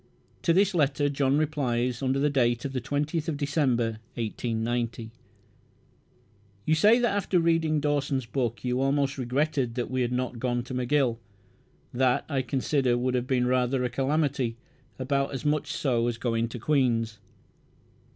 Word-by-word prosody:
To 170 - +2
this 195 +3 +3
letter 145 -3 +2
John 140 0 +1
replies 125 -6 0
under 135 0 +1
date 120 -4 +1
20th 145 +4 -2
December, 140 -5 +1 0.3
1890: 115 0 -2 1.5
"You 155 - +2
say 210 +9 +5
that 240 -4 +1
after 195 -2 +1
reading 165 -2 +2
Dawson's 145 -3 0
book 120 -1 -2
you 125 +1 0
almost 140 0 +1
regretted 130 -1 0
that 125 0 -3
we 130 0 0
had 120 0 0
not 125 -1 -2
gone 120 0 -1
to 125 - -8
McGill. 125 -1 +1 0.7
That, 125 0 +2
I 140 -3 0
consider, 130 -1 0
would 125 +1 0
have 125 0 -1
been 125 -2 +1
rather 125 +1 +1
a 125 - -1
calamity, 135 -3 0 0.4
about 140 +1 -1
as 135 - -6
much 150 0 0
so 120 -4 0
as 120 -1 -2
going 115 -1 0
to 120 - -6
Queen's." 115 -5 +1
130 Hz, 145 wpm, -27 LUFS, 120-145 Hz, 1.5 s, say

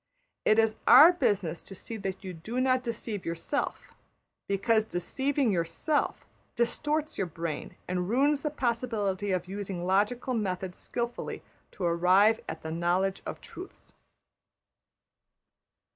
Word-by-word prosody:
It 215 - +5
\emph{is} 225 -1 +3
our 335 +4 +10
business 195 - 0
to 195 - -10
see 225 - -6
that 195 -2 -5
you 185 -1 -5
do 215 +10 -4
not 255 0 +3
deceive 230 -4 -4
yourself, 170 - -3 0.5
because 215 +3 +2
deceiving 265 - 0
\emph{yourself} 195 - 0 0.4
distorts 295 +6 0
your 190 - 0
brain 165 -1 -5
and 180 0 -1
ruins 280 +5 +3
the 300 - -1
possibility 230 -7 -1
of 180 -1 -1
using 190 -2 -4
logical 210 +7 +1
methods 190 -4 -2
skilfully 240 0 -4 0.3
to 190 - -6
arrive 185 +6 +4
at 160 - -6
the 160 - -4
knowledge 175 +4 0
of - - -6
truths. 370 - -11
205 Hz, 130 wpm, -29 LUFS, 180-245 Hz, 0.5 s, our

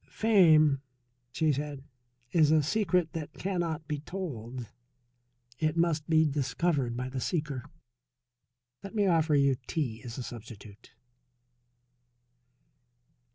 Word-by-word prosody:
"Fame," 160 -10 +4 0.5
she 155 +3 +1
said, 145 -1 -4 0.5
"is 155 -3 +4
a 155 -1 +4
secret 180 -1 +1
that 160 -3 -5
cannot 170 -5 -2
be 150 -1 -2
told. 130 - -6 0.9
It 155 +1 0
must 165 -2 +1
be 160 -1 +5
discovered 135 -2 0
by 125 +1 -3
the 130 0 -4
seeker. 150 -7 -2 1.2
Let 200 +3 -8
me 205 -2 +3
offer 165 -4 +3
you 140 -2 +3
tea 125 -9 -2
as 120 -2 -7
a 130 - -4
substitute." 110 -3 -11
150 Hz, 110 wpm, -29 LUFS, 130-170 Hz, 1.2 s, be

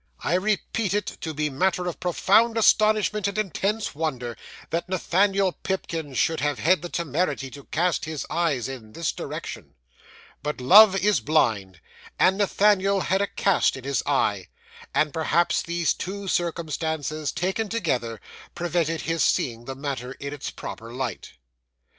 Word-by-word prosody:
I 160 - -1
repeat 205 +1 0
it, 205 - 0 0.2
to 160 - -3
be 150 0 -2
matter 180 +6 0
of 175 - -4
profound 220 +6 +3
astonishment 215 -2 +3
and 200 +1 -4
intense 210 +1 -1
wonder, 130 -6 -3 0.4
that 170 +2 -2
Nathaniel 190 +1 +2
Pipkin 165 -7 -4
should 160 +5 +1
have 145 0 0
had 180 +3 +3
the 175 - -6
temerity 160 -4 -2
to 140 0 -11
cast 175 +2 0
his 155 -2 -4
eyes 155 -7 0
in 120 -5 -9
this 165 0 -1
direction. - - -7 0.7
But 150 -2 -3
love 195 +10 +8
is 205 +1 +2
blind; 105 - 0 0.4
and 190 +2 +3
Nathaniel 200 -1 +3
had 190 +3 +1
a 200 - +1
cast 195 -8 +1
in 130 - -10
his 140 0 0
eye; 105 -9 +1 0.4
and 150 -2 +1
perhaps 165 +2 +2
these 170 -1 0
two 195 +1 -6
circumstances, 160 -3 -2
taken 190 +4 -2
together, 130 - -1 0.4
prevented 170 -2 -1
his 165 -2 0
seeing 120 -1 0
the 135 - -5
matter 135 -2 -4
in 140 +1 -6
its 145 - -5
proper 115 +1 -8
light. 125 -1 -5
165 Hz, 150 wpm, -25 LUFS, 140-190 Hz, 0.7 s, love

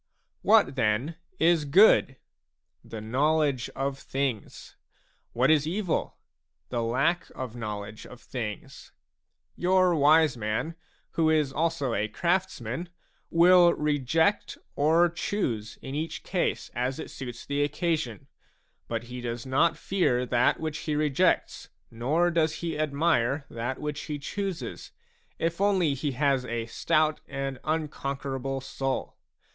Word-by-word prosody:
What 130 - +4
then 125 +6 0 0.2
is 165 -2 +3
good? 145 -3 +5 0.7
The 110 - -8
knowledge 140 +3 +1
of 135 0 -2
things. 135 -6 -4 0.6
What 130 +5 +3
is 155 -1 +3
evil? 185 0 -2 0.5
The 120 -2 -1
lack 135 +10 0
of 125 -3 -6
knowledge 105 -2 -6
of 125 - -12
things. 110 -6 -7 0.6
Your 185 0 +3
wise 155 -1 +5
man, 110 +8 -2 0.4
who 160 -1 +2
is 150 -4 +2
also 160 -6 0
a 105 0 0
craftsman, 170 -3 -2 0.4
will 175 +1 +6
reject 150 +5 +1 0.2
or 160 +4 +4
choose 145 - -3
in 135 - -6
each 155 +3 -4
case 180 -2 -1
as 125 +2 -1
it - - -7
suits 120 -3 -7
the 145 0 -1
occasion; 145 - -2 0.6
but 115 -1 -3
he 125 +1 -8
does 120 0 -4
not 150 +5 +2
fear 155 -10 +1
that 120 0 +2
which 155 -2 -3
he 150 0 -2
rejects, 150 +4 +1 0.2
nor 150 +10 +1
does 160 -2 +1
he 165 -2 -2
admire 145 -3 +1
that 120 +3 -3
which 150 0 -4
he 150 - -4
chooses, 190 +5 -5 0.5
if 165 +3 -2
only 190 -7 +3
he 140 +1 -2
has 135 0 +1
a 120 -2 -3
stout 155 +6 +1
and 135 -1 -4
unconquerable 140 -3 -3
soul. 135 0 -3
145 Hz, 130 wpm, -27 LUFS, 125-165 Hz, 0.7 s, will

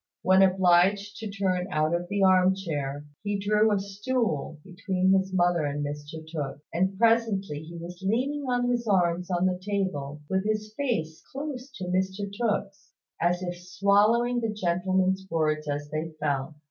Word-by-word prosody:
When 190 +1 +5
obliged 190 +2 +3
to 220 -2 -5
turn 190 -2 -1
out 155 -1 +1
of 175 +1 -1
the 200 -1 +1
arm 185 0 +5
chair, 145 -6 -4 0.2
he 205 0 -1
drew 210 +2 +3
a 205 - +2
stool 200 - -2
between 190 0 0
his 190 0 +1
mother 175 -3 +2
and 145 0 -2
Mr 150 +2 -7
Tooke: 150 -4 -4
and 190 +3 0
presently 220 -8 +2
he 170 +2 -9
was 175 +2 -8
leaning 260 +9 0
on 245 0 +1
his 240 -1 -1
arms 180 -2 +2
on 180 0 +1
the 180 -1 0
table, 185 -8 -3
with 190 +2 0
his 215 0 -2
face 165 - -2
close 275 -2 -5
to 190 - -6
Mr 190 +2 -1
Tooke's, 205 -3 -2 0.3
as 175 +2 +1
if 175 -1 -3
swallowing 205 +6 +3
the 225 -2 -1
gentleman's 190 0 0
words 155 -2 0
as 145 0 -3
they 155 +1 -2
fell. 145 0 -1
190 Hz, 165 wpm, -27 LUFS, 170-205 Hz, 0.3 s, When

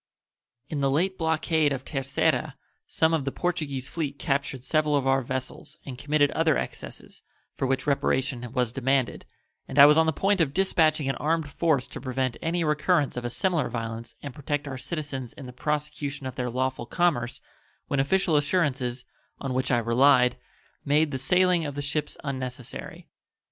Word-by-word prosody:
In 145 -1 -3
the 135 - +2
late 180 +7 +1
blockade 160 -2 +1
of 135 -1 -3
Terceira 135 -2 0 0.3
some 160 0 +2
of 160 -4 +1
the 135 - -2
Portuguese 140 -7 -2
fleet 145 0 -3
captured 140 -3 -1
several 150 +1 +2
of 140 -2 +1
our 135 0 +3
vessels 130 +4 -5
and 135 - -6
committed 145 +2 +2
other 160 -1 +2
excesses, - - -7 0.3
for 135 - -1
which 135 0 0
reparation 130 -3 0
was 125 -3 0
demanded, 135 0 0 0.4
and - - -7
I 140 - +11
was 150 +2 +6
on 160 - +4
the - - +4
point 195 +4 +1
of 145 -3 0
dispatching 160 -6 +2
an 135 - -1
armed 155 -1 0
force 145 -5 +1
to - - -8
prevent 130 -1 -1
any 170 +1 0
recurrence 150 -1 +2
of 125 -1 -4
a - - -1
similar 170 0 0
violence 115 -1 -5
and 140 -3 -6
protect 145 +1 -3
our 135 - -4
citizens 135 -2 -5
in 135 - -10
the 125 - -9
prosecution 150 0 -3
of 130 - -4
their 125 -1 -2
lawful 130 0 -2
commerce 145 -9 0 0.5
when 140 - 0
official 170 +4 +2
assurances, 140 -5 0 0.3
on 135 -2 -3
which 130 +1 0
I 125 - +3
relied, 125 +2 +4 0.5
made 150 +1 +2
the 130 - -3
sailing 180 +5 +3
of 145 -2 -4
the 145 - -2
ships 150 +1 -2
unnecessary. 130 -3 -5
140 Hz, 175 wpm, -26 LUFS, 130-155 Hz, 0.5 s, I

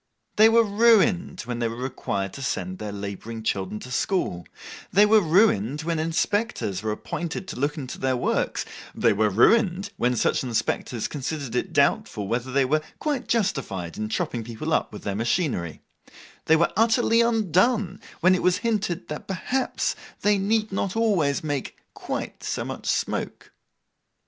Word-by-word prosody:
They 215 +1 +8
were 230 +1 +5
ruined, 205 -4 +3
when 120 -1 -5
they 120 - +1
were 115 - -5
required 100 -6 -3
to 140 - -8
send 185 +7 -3
labouring 105 +2 -6
children 100 0 -2
to 125 - -9
school; 125 - -1 0.4
they 205 +3 +6
were 215 0 +5
ruined 155 - +3
when 165 0 -1
inspectors 165 - -1
were 110 0 -2
appointed 170 - -4
to - - -6
look 145 +3 0
into 130 -4 -6
their 130 -1 +1
works; - - -1 0.3
they 115 - +3
were 105 +1 +2
ruined, 195 - +3
when 125 +1 +1
such 120 - +1
inspectors 120 -1 -1
considered 140 -3 -4
it 125 - -1
doubtful 100 -2 +1
whether 120 +4 -2
they 135 0 +3
were 155 +4 +1 0.2
quite 290 -5 -2
justified 135 - -1
in 110 0 -4
chopping 115 +1 -2
people 120 +8 -4
up - - +1
with 105 - -9
their 100 - -2
machinery; 110 - -1 0.6
they 160 - +5
were 170 +1 +2
utterly 230 +1 +4
undone, 215 -2 +2 0.2
when 185 +2 +6
it 185 - +1
was 180 0 +3
hinted 205 -6 -1
that 150 - -6
perhaps 250 +7 -1 0.3
they 205 -1 +3
need 215 +2 +1
not 195 0 -2
always 185 -12 +1
make 145 -3 -3 0.2
quite - - -5
so - - -2
much - - -6
smoke. - - -2
155 Hz, 160 wpm, -25 LUFS, -, 0.6 s, They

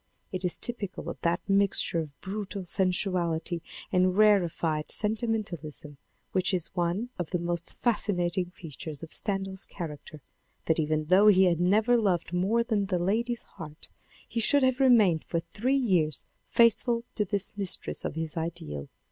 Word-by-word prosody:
It 185 0 -4
is 180 - +1
typical 210 -6 -2
of - - -12
that 170 +2 -1
mixture 195 -3 +3
of 150 -3 -7
brutal 200 -1 -5
sensuality 180 -3 0 0.3
and 185 0 +2
rarefied 170 -7 +2
sentimentalism 210 - -3 0.3
which 185 +1 +1
is 175 -3 -3
one 180 +7 -1
of 175 - -3
the 180 - 0
most 170 0 -3
fascinating 185 -6 0
features 155 -3 -9
of 160 - -7
Stendhal's 195 -1 -1
character, 150 -4 -8 0.4
that 160 0 +1
even 155 0 0
though 185 +6 +5
he 190 -2 +7
had 175 -3 +3
never 215 +7 +3
loved 180 -6 0
more 200 +6 +2
than 215 -4 0
the 185 -2 0
lady's 225 +7 -1
heart, 155 -1 -11 0.4
he 230 - -3
should 280 +5 +4
have 260 0 +2
remained 220 - +5
for 170 - -2
three 230 +10 -1
years 180 - +1 0.2
faithful 235 0 +3
to 210 - 0
this 200 0 -1
mistress 195 -3 -3
of - - -4
his 160 -1 -4
ideal. 155 - -5
185 Hz, 155 wpm, -28 LUFS, 165-210 Hz, 0.4 s, he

